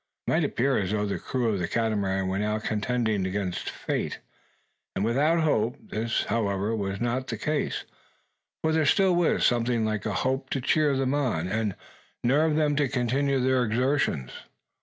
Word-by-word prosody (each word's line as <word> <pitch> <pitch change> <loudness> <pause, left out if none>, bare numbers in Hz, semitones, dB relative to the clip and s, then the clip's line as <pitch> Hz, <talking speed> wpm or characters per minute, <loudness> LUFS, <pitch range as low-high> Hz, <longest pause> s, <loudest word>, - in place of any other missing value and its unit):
It - - -1
might - - +3
appear 135 +1 +1
as 95 -3 -1
though 105 0 0
the 100 - -2
crew 125 -2 -1
of 100 -3 0
the 85 - -1
Catamaran 100 -4 0
were 95 +1 -1
now 105 +1 0
contending 110 -2 -1
against 95 -1 -3
fate, - - -3 0.8
and 100 - 0
without 150 +8 +2
hope. 120 -6 +1
This, 110 +2 -2
however, 105 -1 0
was 100 -2 -3
not 120 +2 -1
the 115 - -3
case; 150 +7 -1 0.8
for 160 - +2
there 160 - +2
was 150 -3 +3
still 180 -3 +3
something 120 -1 +2
like 110 -1 -2
a 105 - -1
hope 130 +7 -1
to 135 - -1
cheer 145 +1 +2
them 135 0 +1
on, 125 - 0
and 105 -1 -1 0.5
nerve 150 +5 +3
them 150 -1 +2
to 145 -2 +3
continue 135 +3 +1
their 130 0 +2
exertions. 120 - 0
120 Hz, 175 wpm, -27 LUFS, 105-135 Hz, 0.8 s, might